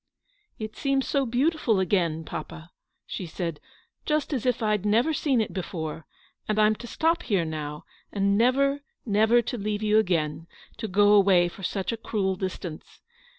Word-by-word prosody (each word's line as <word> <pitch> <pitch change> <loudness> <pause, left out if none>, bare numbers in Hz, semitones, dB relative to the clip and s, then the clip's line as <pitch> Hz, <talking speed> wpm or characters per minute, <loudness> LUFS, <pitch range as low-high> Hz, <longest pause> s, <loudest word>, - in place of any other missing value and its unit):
" 420 -3 -43
It 215 - -10
seems 275 -1 0
so 275 -2 +1
beautiful 250 - +1
again, 170 -4 +1
papa," 160 +2 -8 0.3
she 185 - -5
said, 165 -1 -4 0.4
"just 305 0 0
as 255 -2 -1
if 245 -2 +1
I'd 210 -2 +1
never 230 +9 +2
seen 275 -4 +1
it 220 - -1
before; 160 -4 -5 0.4
and 215 - 0
I'm 215 0 +5
to 240 - -9
stop 330 +7 +1
here 195 - 0
now, 150 -1 -5 0.3
and 200 0 +1
never, 275 +5 +3 0.2
never 220 +2 +4
to 245 +1 -4
leave 210 +1 -2
you 215 0 +4
again, 165 -5 -1 0.3
to 225 -1 -4
go 205 +1 +4
away 190 -4 +5
for 185 - -13
such 190 +2 -2
a 230 - -3
cruel 195 -4 -1
distance. 185 -3 -6
210 Hz, 170 wpm, -26 LUFS, 180-240 Hz, 0.4 s, I'm